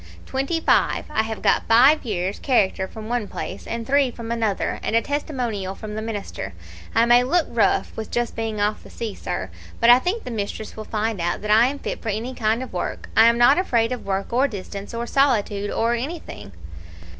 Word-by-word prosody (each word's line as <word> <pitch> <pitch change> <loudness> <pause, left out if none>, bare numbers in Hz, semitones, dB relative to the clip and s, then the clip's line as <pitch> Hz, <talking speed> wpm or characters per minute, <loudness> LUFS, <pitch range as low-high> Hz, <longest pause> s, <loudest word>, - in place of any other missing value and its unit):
"'Twenty 275 +5 -1
five. - - +2
I 220 - +2
have 220 0 -5
got - - +2
five 260 +7 +6
years' 195 -4 -2
character 195 -7 +1
from 215 +2 -9
one 240 -3 -1
place, - - -6
and 230 0 -4
three 275 +1 +3
from 230 -1 -7
another, 225 -4 -1
and - - -1
a 230 - +5
testimonial 245 - -3
from 210 +1 -7
the 215 - -3
minister. 205 - -5 0.4
I 230 - +5
may 240 +1 +6
look 325 +6 +2
rough, 205 -4 +1
with 220 -1 -5
just 240 -1 -2
being 225 -2 -3
off 210 +1 0
the - - -14
sea, 225 -3 -5
sir, 95 - -5 0.3
but 235 +1 +7
I 245 - +8
think 380 - -2
the 250 - -6
mistress 215 0 -4
will 215 - -7
find 215 -3 -2
out 175 +4 -1
that 210 - -1
I 225 +3 +6
am 280 +2 -3
fit - - -5
for 225 - -4
any 225 +5 -3
kind 225 +1 0
of 255 - -10
work. 180 - -4
I 225 +1 +7
am 235 0 +4
not 245 +7 +6
afraid 235 -10 +1
of 250 - -4
work 195 +2 -3
or 260 +4 +3
distance, 200 -1 -7
or 235 0 -2
solitude, 220 -7 +1
or 230 +1 +1
anything.' 270 - -5
230 Hz, 215 wpm, -23 LUFS, 210-250 Hz, 0.4 s, I